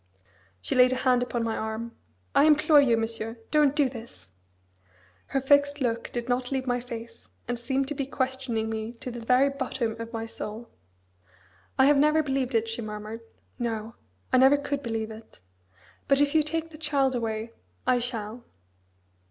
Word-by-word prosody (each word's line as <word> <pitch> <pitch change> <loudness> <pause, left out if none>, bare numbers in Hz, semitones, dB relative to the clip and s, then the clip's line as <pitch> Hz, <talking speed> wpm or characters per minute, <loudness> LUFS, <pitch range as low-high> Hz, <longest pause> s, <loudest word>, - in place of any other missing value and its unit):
She 95 - -2
laid 250 0 +6
a 255 - -4
hand 250 -1 +4
upon 245 -1 -1
my 225 -1 -1
arm: 220 +2 -4 0.4
"I 285 - +5
implore 300 -1 +6
you, 240 -5 +3
Monsieur, 225 0 -3
don't 295 -2 +4
do 290 -3 +4
this!" 230 - -11 1.0
Her 270 - 0
fixed 285 +1 +3
look 235 -3 -1
did 240 0 -4
not 250 +1 -1
leave 265 -1 -1
my 245 -1 0
face, 230 -1 -9 0.2
and 240 0 -2
seemed 265 +3 -1
to - - -1
be 275 -2 -3
questioning 260 -5 -2
me 220 +1 -4
to 245 +1 -7
the 240 - -6
very 255 +4 +3
bottom 260 -4 -2
of 230 0 -7
my 225 -1 -4
soul. 225 +1 -7 1.1
"I 265 - +6
have 285 0 +5
never 305 +2 +4
believed 270 -3 -1
it," 225 0 +2
she 225 +1 -4
murmured, 215 +1 -6 0.4
"No! 225 -2 -3 0.4
I 255 - +6
never 265 +2 +6
could 285 0 -3
believe 225 -3 -3
it. 220 - -12 0.7
But 275 0 +4
if 285 0 +3
you 315 - +5
take 325 +2 -3
the 305 - -12
child 280 -4 +1
away 225 -1 -3 0.3
I 250 - +3
shall." 235 -1 -4
245 Hz, 175 wpm, -27 LUFS, 225-275 Hz, 1.1 s, laid